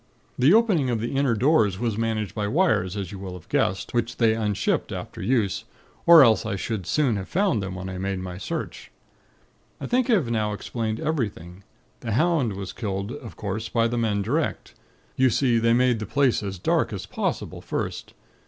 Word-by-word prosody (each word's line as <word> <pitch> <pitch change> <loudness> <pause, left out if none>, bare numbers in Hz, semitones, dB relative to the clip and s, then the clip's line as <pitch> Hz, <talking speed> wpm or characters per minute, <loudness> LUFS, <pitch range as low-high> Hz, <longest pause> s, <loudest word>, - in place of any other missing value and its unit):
"The 130 +5 +4
opening 200 - +4
of 120 -2 0
the 120 +4 -3
inner 135 -4 +2
doors 110 - +3
was 115 -1 -1
managed 110 -2 -2
by 105 -2 -2
wires, 105 - +1
as 95 -3 -4
you 100 - -8
will 95 -1 -6
have 90 -3 -11
guessed, 95 - 0
which 120 -1 -1
they 115 -2 +4
unshipped 105 -3 -1
after - - -6
use, 115 -7 0 0.4
or 165 -3 +10
else 115 -4 +4
I 110 -3 -2
should 100 -2 -4
soon 135 -8 +1
have 95 - -6
found 190 - +1
them, 95 -1 -5
when 95 0 -6
I 95 -1 -5
made 95 0 -2
my 90 0 -6
search. - - -5 0.9
"I - - -5
think 250 +1 +1
I - - +5
have 150 - +1
now 105 -2 0
explained 110 +1 -3
everything. 100 - -3 0.4
The 115 - -4
hound 145 - +2
was 95 -1 -6
killed, 100 -1 -4
of 115 -9 -9
course, 105 +2 -4
by 115 -1 +2
the 120 - -3
men 110 -4 0
direct. 150 +10 -2 0.4
You 130 0 +4
see, 120 -2 +2
they 115 0 +3
made 125 -1 +3
the 110 - -5
place 140 -1 +2
as 100 -2 -5
dark 90 - +1
as - - -5
possible, - - -3
first. - - -4
115 Hz, 200 wpm, -24 LUFS, 100-130 Hz, 0.9 s, or